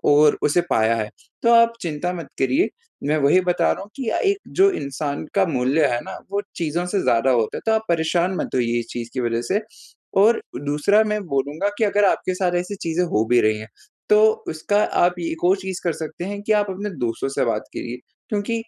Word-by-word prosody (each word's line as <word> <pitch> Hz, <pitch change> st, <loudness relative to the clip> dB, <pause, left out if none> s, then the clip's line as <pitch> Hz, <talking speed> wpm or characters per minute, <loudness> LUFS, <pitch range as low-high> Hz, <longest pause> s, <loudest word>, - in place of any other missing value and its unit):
और 145 Hz, +1 st, +5 dB
उसे 150 Hz, +4 st, +3 dB
पाया 110 Hz, +1 st, +3 dB
है। 110 Hz, -1 st, -3 dB, 0.3 s
तो 235 Hz, 0 st, +5 dB
आप 230 Hz, 0 st, +6 dB
चिंता 170 Hz, +2 st, -2 dB
मत 165 Hz, -6 st, -7 dB
करिए, 280 Hz, -, +2 dB, 0.4 s
मैं 150 Hz, +2 st, +1 dB
वही 145 Hz, +6 st, +4 dB
बता 180 Hz, -1 st, +1 dB
रहा -, -, -5 dB
हूँ 205 Hz, -, -12 dB
कि 260 Hz, -4 st, -4 dB
अ, -, -, 0 dB
एक 400 Hz, 0 st, +1 dB
जो 390 Hz, +1 st, +4 dB
इंसान 140 Hz, -, -4 dB
का 195 Hz, -2 st, +3 dB
मूल्य 140 Hz, +1 st, +2 dB
है 120 Hz, -2 st, 0 dB
ना, -, -, -8 dB
वो 200 Hz, 0 st, 0 dB
चीज़ों 170 Hz, +1 st, -1 dB
से 195 Hz, +2 st, 0 dB
ज़्यादा 120 Hz, +3 st, +2 dB
होता 115 Hz, -3 st, +1 dB
है। -, -, -5 dB
तो 220 Hz, -, +3 dB
आप 220 Hz, 0 st, +1 dB
परेशान 170 Hz, +2 st, +1 dB
मत -, -, -4 dB
होइए 120 Hz, -1 st, +1 dB
इस 115 Hz, -, -7 dB
चीज़ 120 Hz, -1 st, -5 dB
की 130 Hz, -, -1 dB
वजह 120 Hz, 0 st, -1 dB
से 210 Hz, +2 st, +1 dB, 0.6 s
और 225 Hz, +3 st, +4 dB, 0.2 s
दूसरा 175 Hz, +9 st, +3 dB
मैं 210 Hz, 0 st, -1 dB
बोलूँगा 145 Hz, +7 st, -1 dB
कि 220 Hz, -, +3 dB
अगर 205 Hz, 0 st, +2 dB
आपके 185 Hz, -, -1 dB
साथ 180 Hz, -1 st, 0 dB
ऐसी 190 Hz, +3 st, -5 dB
चीज़ें 170 Hz, +2 st, 0 dB
हो 110 Hz, -8 st, +1 dB
भी 120 Hz, -1 st, +5 dB
रही 110 Hz, 0 st, +2 dB
हैं, 110 Hz, 0 st, -9 dB, 0.4 s
तो 215 Hz, +1 st, +4 dB
उसका 205 Hz, +7 st, 0 dB
आप 175 Hz, 0 st, +2 dB
य -, -, -4 dB
एक 165 Hz, -, -8 dB
और 185 Hz, +2 st, +4 dB
चीज़ 190 Hz, -1 st, -5 dB
कर 170 Hz, -, +1 dB
सकते 160 Hz, +2 st, -6 dB
हैं 200 Hz, +1 st, -5 dB
कि 215 Hz, -, +1 dB
आप 205 Hz, -1 st, +2 dB
अपने 200 Hz, +2 st, -4 dB
दोस्तों 115 Hz, +2 st, -1 dB
से 135 Hz, -, 0 dB
बात 110 Hz, -2 st, -1 dB
करिए। 120 Hz, +1 st, -5 dB, 0.3 s
क्योंकि 220 Hz, +2 st, -2 dB
170 Hz, 230 wpm, -22 LUFS, 135-205 Hz, 0.6 s, आप